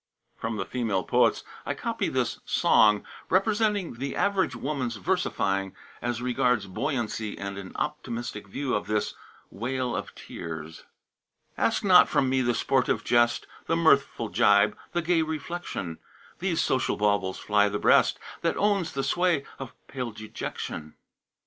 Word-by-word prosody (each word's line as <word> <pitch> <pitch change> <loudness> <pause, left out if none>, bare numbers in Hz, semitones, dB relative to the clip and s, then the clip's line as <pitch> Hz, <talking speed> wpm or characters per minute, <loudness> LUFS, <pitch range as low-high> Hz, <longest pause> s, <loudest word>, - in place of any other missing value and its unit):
From 115 -1 -4
the 95 - -2
"Female 110 -7 -1
Poets" - - +2 0.2
I - - -3
copy - - -2
this - - -1
"Song," 105 -1 +4 0.2
representing 205 -1 +2
the 135 +2 -4
average 200 -1 +1
woman's 130 -5 -2
versifying 100 - -1 0.3
as 120 0 -2
regards 125 -3 +1
buoyancy 110 +1 -3
and 100 0 -5
an 95 -1 -8
optimistic 115 -3 -4
view 130 +6 -3
of 105 - -1
this 105 0 0 0.4
"Wale 125 +3 -2
of - - -5
Tears": 80 -1 -8 0.7
"Ask - - +1
not - - +7
from 135 - +2
me 130 0 +2
the 120 -1 +1
sportive 130 -2 +1
jest, 120 0 +3 0.2
The 165 - +2
mirthful 140 -8 +3
jibe, 105 +1 +4 0.2
the 175 -1 -1
gay 170 0 +3
reflection; 155 - -4 0.4
These 175 -3 0
social 130 0 +1
baubles 100 -3 +1
fly 105 -1 +2
the 105 - -2
breast - - +4 0.2
That - - 0
owns 195 -5 +1
the 135 - -1
sway 175 -4 +1
of 135 -3 -7
pale 125 -3 -4
Dejection. 105 -7 -6
120 Hz, 145 wpm, -27 LUFS, 105-155 Hz, 0.7 s, not